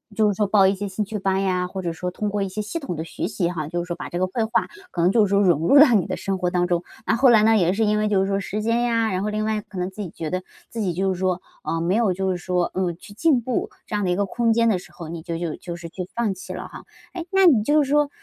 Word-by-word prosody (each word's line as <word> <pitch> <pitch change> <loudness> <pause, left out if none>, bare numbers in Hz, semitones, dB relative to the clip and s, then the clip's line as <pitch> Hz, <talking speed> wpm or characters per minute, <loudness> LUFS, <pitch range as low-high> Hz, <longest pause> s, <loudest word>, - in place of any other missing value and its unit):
就 215 -1 +3
是 - - +1
说 205 +1 0
报 195 -1 +5
一 195 - +4
些 205 +1 -4
兴 195 +2 -2
趣 210 0 -5
班 195 0 0
呀， 180 -1 0
或 190 +1 -5
者 170 -2 -2
说 180 +2 -4
通 205 +3 -3
过 205 0 -2
一 195 - 0
些 190 +3 -4
系 220 +11 -4
统 260 - -5
的 160 - -4
学 165 - -4
习 185 -5 -1
哈， 155 -4 -4
就 175 +1 -2
是 - - -8
说 175 -1 -5
把 - - -6
这 175 - -5
个 185 +1 +1
绘 220 +3 -1
画， 225 - 0 0.2
可 170 - -2
能 180 +2 +4
就 220 -1 +4
是 195 - -3
说 200 0 +3
融 170 -3 +2
入 280 - +6
到 280 -4 +8
你 195 -5 +3
的 - - -2
生 195 -1 -2
活 180 -1 0
当 175 0 +1
中。 175 0 0 0.2
那 - - +2
后 265 -2 +6
来 220 -2 +6
呢 225 0 +5
也 180 -1 +2
是 220 +2 +1
因 210 0 +2
为 215 - +1
就 200 -2 +2
是 195 - 0
说 195 0 0
时 210 +2 -4
间 230 +1 +1
呀， 230 -3 +1
然 185 +1 -1
后 - - -1
另 215 0 -1
外 215 0 0
可 205 -2 -11
能 180 +1 -1
自 210 +2 -8
己 185 - -5
觉 160 -1 -5
得， 185 0 -2 0.3
自 230 - -6
己 185 -5 0
就 190 +2 0
是 180 - -7
说， 185 -1 0 0.2
呃， 165 0 -2
没 180 +4 +1
有 220 -5 +2
就 190 +1 -1
是 180 - -1
说， 180 0 -1
嗯， 180 -2 -1
去 205 +3 -13
进 270 +1 +2
步， 245 +1 -2 0.2
这 - - -10
样 205 -2 0
的 - - 0
一 180 - +2
个 200 - +1
空 230 +3 +1
间 230 0 +3
的 190 -5 +1
时 175 -1 -15
候， 165 -2 -9
你 165 -1 -6
就 165 0 -4
就 170 -2 -3
就 175 -1 -7
是 170 -1 -8
去 180 +1 -6
放 230 -4 0
弃 185 - -8
了 - - -7
哈。 - - -10 0.3
哎， 345 -2 -6
那 385 -1 +4
你 260 -11 +6
就 295 +6 +3
是 270 - -5
说， 295 0 +3
195 Hz, 360 characters per minute, -23 LUFS, 180-220 Hz, 0.3 s, 到